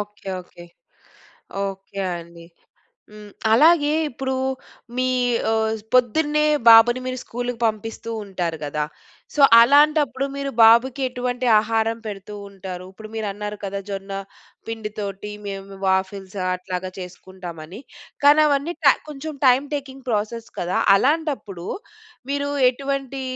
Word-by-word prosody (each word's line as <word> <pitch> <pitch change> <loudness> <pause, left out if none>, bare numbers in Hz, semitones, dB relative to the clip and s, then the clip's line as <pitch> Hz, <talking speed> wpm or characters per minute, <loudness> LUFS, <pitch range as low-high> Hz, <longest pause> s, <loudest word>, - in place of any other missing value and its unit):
Okay, 205 -1 -9
okay. 175 -1 -14 1.0
Okay 195 0 -6 0.2
అండి. 170 0 -11 0.7
హ్మ్, 210 -1 -12 0.2
అలాగే 300 +4 +5 0.2
ఇప్పుడు 265 +2 -4 0.6
మీ 255 0 +1 0.4
ఆహ్, 220 0 +1 0.2
పొద్దున్నే 295 +5 +3 0.2
బాబుని 230 +2 +8
మీరు 255 0 -3
స్కూల్‌కి 245 0 -5
పంపిస్తూ 225 +1 -4
ఉంటారు 175 -4 -3
కదా. 150 +1 -2 0.5
సో 295 - -1 0.2
అలాంటప్పుడు 285 0 +4
మీరు 280 0 -3
బాబుకి 235 +4 +5
ఎటువంటి 250 0 -3
ఆహారం 225 +1 0
పెడుతూ 205 0 -7
ఉంటారు? 185 -2 -8
ఇప్పుడు 215 +2 -11
మీరన్నారు 210 -1 -4
కదా 200 0 -3
జొన్న 195 0 -5 0.5
పిండి 220 -2 -5
తోటి 200 0 -5 0.2
మేము 195 0 -7
వాఫిల్స్ 190 +1 -1 0.2
అట్లాగా 185 0 -5
చేసుకుంటామని. 180 0 -9 0.4
కానవన్నీ 295 +2 +4
ట 275 - +7
కొంచెం 300 +1 -6
టైమ్ 260 +3 +4
టేకింగ్ 270 -2 -7
ప్రాసెస్ 220 +2 -2
కదా! 180 +1 -1 0.2
అలాంటప్పుడు 270 - -1 0.6
మీరు 285 0 -1 0.2
ఎటువంటి 275 0 -4
225 Hz, 115 wpm, -22 LUFS, 195-270 Hz, 1.0 s, బాబుని